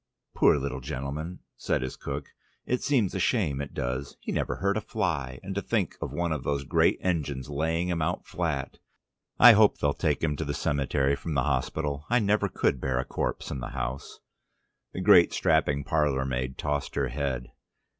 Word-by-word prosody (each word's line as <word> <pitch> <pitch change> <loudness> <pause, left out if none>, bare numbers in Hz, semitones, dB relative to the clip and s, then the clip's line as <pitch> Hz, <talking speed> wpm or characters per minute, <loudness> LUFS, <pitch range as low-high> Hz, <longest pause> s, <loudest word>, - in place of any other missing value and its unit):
"Poor - - +5
little 70 -1 -3
gentleman," 75 +5 -5 0.2
said - - -1
his 65 - -4
cook. 70 0 -5 0.4
"It 125 - 0
seems 120 -10 +1
a 95 - -2
shame 85 - +1
it 70 - -6
does. 65 +3 -3
He - - -5
never - - -1
hurt 100 +1 0
a 110 - 0
fly, 80 - -2
and 95 +1 -5
to 100 - -1
think 100 -7 -1
of - - -3
one 85 -1 -1
of 75 -4 -2
those 70 -1 -1
great - - +3
engines 75 -7 -2
laying 80 +4 0
him 85 -2 -1
out 85 +3 -1
flat. 80 -6 -3 0.6
I 120 - +10
hope 110 -1 +5
they'll 70 -1 +1
take 75 -2 -1
him 75 -2 +1
to 80 - -2
the 70 -1 -3
cemetery 70 -1 +1
from 80 +1 -5
the 65 - +2
hospital: 70 +3 -2
I 120 - +4
never 105 -2 +2
could 65 -7 0
bear 65 -2 0
a 65 - -1
corpse - - -3
in 70 - -3
the - - -4
house." 65 +2 -4 0.7
The - - -5
great - - +6
strapping 70 0 +2
parlour 70 -2 +1
maid 65 0 -3
tossed 75 -1 -2
her 70 -2 0
head. 65 -2 -3
70 Hz, 195 wpm, -27 LUFS, 65-85 Hz, 0.7 s, I